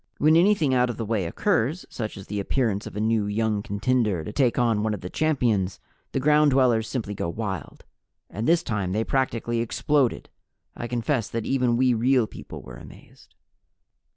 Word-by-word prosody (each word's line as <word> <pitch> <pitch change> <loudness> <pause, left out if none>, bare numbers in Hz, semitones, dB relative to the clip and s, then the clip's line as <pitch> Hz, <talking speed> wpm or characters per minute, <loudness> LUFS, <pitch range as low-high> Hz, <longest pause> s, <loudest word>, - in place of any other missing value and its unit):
When 155 +2 +4
anything 170 -5 +4
out 125 -1 +3
of 120 - -4
the 115 - -3
way 105 -4 -1
occurs, 155 - 0
such 110 -4 -5
as 95 - -9
the 105 0 -4
appearance 105 -1 -1
of - - -10
a - - -3
new 110 -1 +1
young 105 0 0
contender 105 -3 0
to 105 - -7
take 125 -2 +2
on 115 -4 +2
one 110 0 0
of 100 - -10
the 90 - -7
champions, 120 -12 0 0.3
the - - -1
Ground 150 +2 +4
Dwellers 125 -5 +3
simply 110 -6 -3
go 85 - -3
wild. 95 -4 -5 0.4
And 110 +3 -4
this 170 0 +3
time 100 -6 -2
they 110 +2 +1
practically 120 -2 -1
exploded. 130 +3 0 0.5
I 120 - -5
confess 120 0 -1
that 115 -1 -3
even 125 -3 +1
we 130 0 +3
Real 125 +1 +3
People - - -10
were - - -10
amazed. - - -16
115 Hz, 185 wpm, -25 LUFS, 105-130 Hz, 0.5 s, When